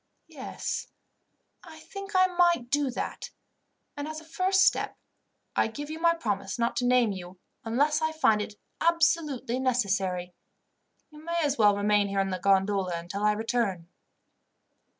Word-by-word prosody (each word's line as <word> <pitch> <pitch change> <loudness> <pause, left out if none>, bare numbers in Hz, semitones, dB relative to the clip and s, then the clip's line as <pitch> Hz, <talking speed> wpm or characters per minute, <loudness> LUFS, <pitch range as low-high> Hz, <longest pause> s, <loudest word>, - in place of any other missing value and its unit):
Yes, - - -5 0.8
I 320 -3 -12
think 395 +5 -9
I 370 0 +6
might 345 -8 +2
do 290 -1 +2
that; 245 - -5 0.7
and 290 +1 -5
as 310 0 -5
a - - -14
first 375 +3 +2
step, - - +1 0.6
I - - +3
give 290 +7 -7
you 315 - -6
my 335 0 +3
promise 200 - -3
not 235 0 0
to 245 - +1
name 245 -3 +4
you, 185 -1 -8 0.3
unless 285 +7 +1
I 315 0 +1
find 225 -10 +3
it 210 0 -6 0.3
absolutely 325 -7 +1
necessary. 195 -8 0 0.8
You 300 0 -14
may 340 +1 -2
as 285 -3 0
well 205 -2 +5
remain 205 0 +2
here 195 0 -1
in 195 0 0
the 185 - -3
gondola 195 0 +2
until 175 +4 -6
I 210 0 +4
return." 215 -6 -2
245 Hz, 155 wpm, -28 LUFS, 200-315 Hz, 0.8 s, I